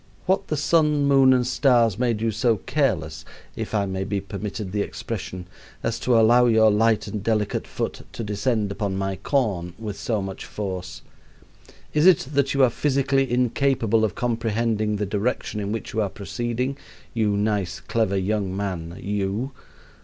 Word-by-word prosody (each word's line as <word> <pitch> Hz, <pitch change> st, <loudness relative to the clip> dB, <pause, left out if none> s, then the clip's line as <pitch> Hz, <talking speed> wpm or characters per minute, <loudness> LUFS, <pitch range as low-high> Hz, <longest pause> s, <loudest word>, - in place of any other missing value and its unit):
What 190 Hz, +1 st, +1 dB
the 155 Hz, -, -1 dB
sun, 150 Hz, -1 st, +3 dB
moon, 135 Hz, -2 st, +6 dB
and 125 Hz, -1 st, +3 dB
stars 120 Hz, -5 st, +3 dB
made 120 Hz, -4 st, +1 dB
you 115 Hz, -, +2 dB
so 115 Hz, +1 st, +2 dB
careless 110 Hz, -, -1 dB, 0.3 s
(if -, -, -4 dB
I 100 Hz, -1 st, +2 dB
may 95 Hz, 0 st, -3 dB
be 100 Hz, +1 st, -2 dB
permitted 100 Hz, 0 st, -5 dB
the 105 Hz, +1 st, 0 dB
expression) 95 Hz, -4 st, -5 dB, 0.4 s
as 115 Hz, 0 st, -1 dB
to 120 Hz, -2 st, +3 dB
allow 120 Hz, +2 st, +5 dB
your 110 Hz, -2 st, +5 dB
light 110 Hz, +1 st, +2 dB
and 105 Hz, -3 st, -5 dB
delicate 105 Hz, -2 st, 0 dB
foot -, -, -4 dB
to 115 Hz, -, -5 dB
descend 105 Hz, 0 st, -1 dB
upon 100 Hz, -1 st, -2 dB
my 95 Hz, 0 st, -2 dB
corn 95 Hz, -, -1 dB
with 105 Hz, -3 st, -6 dB
so 110 Hz, +1 st, -1 dB
much 95 Hz, -1 st, -5 dB
force? 95 Hz, -2 st, -5 dB, 0.9 s
Is 150 Hz, +3 st, +4 dB
it 165 Hz, -7 st, +5 dB
that 140 Hz, 0 st, +1 dB
you 135 Hz, -, +4 dB
are 125 Hz, -, +5 dB
physically 135 Hz, 0 st, +1 dB
incapable 120 Hz, -2 st, +2 dB
of 105 Hz, -3 st, 0 dB
comprehending 115 Hz, -2 st, 0 dB
the 105 Hz, 0 st, -1 dB
direction 105 Hz, +2 st, -2 dB
in 100 Hz, 0 st, -3 dB
which 115 Hz, 0 st, -4 dB
you 110 Hz, -, +1 dB
are 100 Hz, -, 0 dB
proceeding? 120 Hz, +7 st, -3 dB, 0.3 s
you 105 Hz, -3 st, +1 dB
nice, 100 Hz, -3 st, -1 dB
clever 110 Hz, -4 st, 0 dB
young 95 Hz, -1 st, -1 dB
man 90 Hz, -4 st, -4 dB
you!" 105 Hz, +5 st, -2 dB
110 Hz, 170 wpm, -24 LUFS, 100-125 Hz, 0.9 s, moon